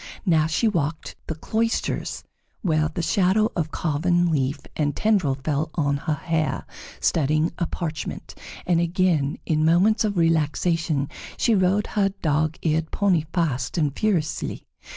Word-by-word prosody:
Now 160 -4 +3
she 160 +8 +1
walked 160 -6 -2
the 160 - -3
cloisters 225 +8 -2 0.4
where 155 -4 +2
the 165 +1 -4
shadow 200 +4 +2
of 160 -3 -1
carven 175 +3 +1
leaf 140 -1 0 0.2
and 145 -2 0
tendril 195 -11 +2
fell 155 +2 0
on 145 -4 +1
her 150 +2 -1
hair, 155 -1 -1 0.3
studying 155 +1 +1
a 170 - 0
parchment; 160 -3 -5 0.3
and 170 -2 +2
again, 170 -5 +1
in 155 -1 +1
moments 185 +8 +4
of 205 -3 -1
relaxation, 165 -2 +1 0.3
she 235 - +2
rode 195 +1 +2
her 200 -2 +1
dog 155 0 +1
eared 160 0 +1
pony 180 -6 +1
fast 145 -8 -1
and 150 -4 +1
furiously. 190 -8 -1
165 Hz, 140 wpm, -24 LUFS, 155-180 Hz, 0.4 s, moments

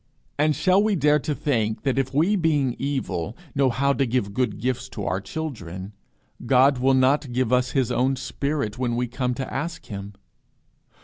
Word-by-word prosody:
And 150 0 +3
shall 185 +1 +3
we 210 -1 +2
dare 150 -2 +3
to 150 +1 -2
think 110 -8 -1
that 135 -2 +1
if 135 -1 -1
we 165 +9 +2
being 150 -8 +1
evil 115 -9 -3 0.2
know 135 -2 +3
how 140 +3 +1
to 135 -1 0
give 115 -4 -1
good 125 +3 0
gifts 130 +2 -2
to 105 -5 -6
our 90 +3 -1
children, 100 - -6 0.5
God 135 +1 +5
will 135 +1 +3
not 130 +1 +2
give 125 0 0
us 125 0 +2
his 130 -4 +1
own 130 +3 +2
spirit 130 -3 -3
when 120 -2 0
we 125 +1 0
come 125 +1 -2
to 135 0 -5
ask 165 +4 -4
him? 100 -1 -7
130 Hz, 185 wpm, -24 LUFS, 120-145 Hz, 0.5 s, God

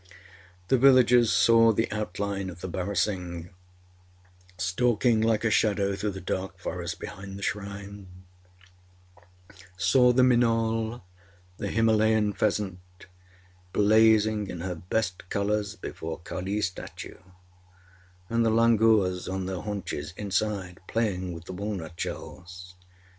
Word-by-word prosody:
The 130 - +4
villagers 125 -3 +6
saw 115 0 +5
the 110 +1 0
outline 100 -1 -3
of 85 -1 -11
the - - -4
barasingh 90 -2 -2 1.1
stalking 110 +5 +2
like 110 -1 +1
a 115 - +1
shadow 100 -2 +2
through 105 +2 -2
the 95 - -6
dark 95 +1 -4
forest - - -5
behind 95 0 -8
the 100 - -8
shrine; 100 -1 -5 1.7
saw 125 +7 +4
the 125 +1 +4
minaul, 115 -2 +1 0.5
the - - -4
Himalayan 110 -1 +2
pheasant, 100 -2 -1 0.9
blazing 110 0 +4
in 90 -3 -6
her 90 +1 -3
best 90 +2 -3
colours 105 0 -1
before 80 -5 -6
Kaliâs 95 +5 -3
statue; 95 - -6 1.1
and 115 +3 +1
the 115 - +3
langurs 110 -5 +3
on 95 0 -3
their 95 -1 -4
haunches, 95 -6 -5
inside, 100 -2 -2
playing 95 -5 -1
with 85 -1 -9
the 95 - -7
walnut 95 -4 -5
shells. 90 0 -7
100 Hz, 115 wpm, -27 LUFS, 95-110 Hz, 1.7 s, villagers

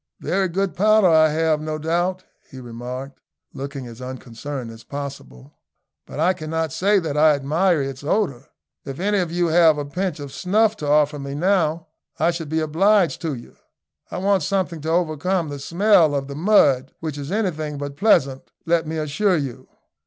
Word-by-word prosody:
"Very 190 +1 0
good 190 +2 -1
powder 215 0 +4
I 160 -1 +5
have 155 0 +1
no 155 0 -3
doubt," 175 +4 -1 0.3
he 130 - -10
remarked, 125 +3 -7 0.3
looking 135 -1 -6
as 120 0 -11
unconcerned 130 0 -7
as 115 0 -13
possible, 90 - -9 0.5
"but - - -8
I 175 +4 +3
cannot 160 -2 -3
say 200 +2 +2
that 160 -6 -2
I 150 0 +5
admire 155 +3 +1
its 135 0 -6
odour. 145 - -1 0.4
If 135 +2 -7
any 205 +2 +1
of 175 -3 -2
you 175 0 +1
have 160 -2 +5
a 145 - -3
pinch 180 +4 -3
of 140 -2 -8
snuff 215 +4 +2
to 150 - -5
offer 150 0 +3
me 140 0 -6
now, 165 -1 +1 0.3
I 165 +2 +2
should 165 -3 -6
be 160 +1 0
obliged 180 +4 +2
to 160 -4 -2
you. 120 - -13 0.5
I - - -5
want 195 0 +2
something 175 -1 -1
to 160 - -4
overcome 170 +1 0
the 145 -1 -6
smell 170 0 +3
of 135 -1 -2
the 140 - -7
mud, 145 -7 +3
which 155 -3 -5
is 145 +3 -6
anything 155 -8 -2
but 140 0 -6
pleasant, 140 -8 +2 0.2
let 165 -1 +1
me 160 +1 -3
assure 165 +5 +1
you." 135 -5 -5
155 Hz, 180 wpm, -22 LUFS, 140-180 Hz, 0.5 s, I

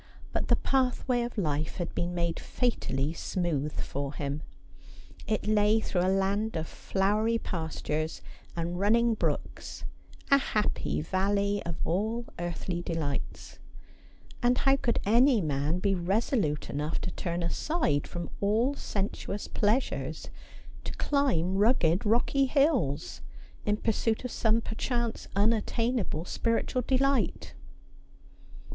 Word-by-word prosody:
But - - -1
the - - +5
pathway 255 -2 +1
of 240 0 -4
life 155 -5 -1
had 175 - -4
been 175 +1 -2
made 170 -1 -1
fatally 155 - -1
smooth 160 -5 -2
for 140 +1 -3
him; 145 +1 -3 0.9
it 215 - 0
lay 210 +1 +4
through 180 -4 -1
a 185 - +2
land 195 +3 +1
of 160 - -3
flowery 210 +4 +1
pastures 160 -4 -3 0.3
and 170 +1 -2
running 230 +4 +4
brooks, 215 - -3 0.5
a 275 - +8
happy 210 -5 0
valley 200 +1 +1
of 170 - -3
all 220 +7 -1
earthly 175 +1 -3
delights; 160 -5 -4 0.8
and 245 +1 +3
how 270 0 +4
could 245 -3 0
any 240 +4 +5
man 150 -1 0
be 195 +2 +1
resolute 185 - 0
enough 150 +3 -2
to - - -3
turn 175 -1 -3
aside 170 - 0
from 175 -1 -5
all 220 +7 +2
sensuous 200 -4 -3
pleasures 220 +6 0 0.5
to - - -4
climb 195 - +1
rugged 205 -5 +3
rocky 255 +5 +3
hills 255 - +1 0.5
in 210 0 +2
pursuit 225 +1 0
of 250 - -3
some 225 0 +2
perchance 235 +1 -2
unattainable 220 -3 +1
spiritual 230 +5 0
delight 270 +2 +1
205 Hz, 120 wpm, -29 LUFS, 170-235 Hz, 0.9 s, a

